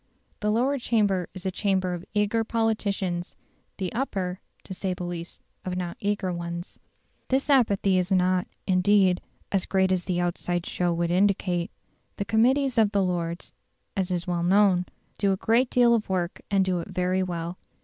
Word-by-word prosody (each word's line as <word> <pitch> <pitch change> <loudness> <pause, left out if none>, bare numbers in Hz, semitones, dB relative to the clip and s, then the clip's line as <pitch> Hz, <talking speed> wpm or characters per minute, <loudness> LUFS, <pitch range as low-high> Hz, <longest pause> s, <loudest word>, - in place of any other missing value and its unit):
The 210 - 0
Lower 255 +6 +1
Chamber 205 -7 +1
is 185 0 -8
a 190 - 0
chamber 190 -2 0
of 175 -1 -5
eager 210 +2 +2
politicians; 200 -6 -1 0.4
the 185 -3 -3
Upper 190 -7 -2 0.2
(to 190 - -7
say 185 0 -2
the 180 - -6
least) 175 -1 -6 0.2
of 180 -1 -3
not 175 -1 -3
eager 200 -3 -1
ones. 170 0 -6 0.5
This 270 +2 +1
apathy 200 -7 +3
is 180 +2 -2
not, 185 -1 +2 0.2
indeed, 185 0 +3 0.3
as 195 -2 0
great 190 -1 +2
as 180 -2 0
the 180 -2 -1
outside 175 0 -1
show 175 -1 0
would 170 0 0
indicate. 180 -2 +1 0.5
The 200 - -3
committees 245 +5 +3
of 210 -2 +3
the 200 -1 +3
Lords 170 -2 -2 0.4
(as 190 -2 -1
is 175 -2 -1
well 175 -1 -1
known) 185 0 +4 0.3
do 195 -1 +3
a - - -2
great 235 +5 +2
deal 240 -1 +5
of 220 -3 0
work 180 -2 -2
and 195 -1 +3
do 185 -2 0
it 170 - -6
very 185 +1 0
well. 175 -1 -4
185 Hz, 175 wpm, -26 LUFS, 180-205 Hz, 0.5 s, deal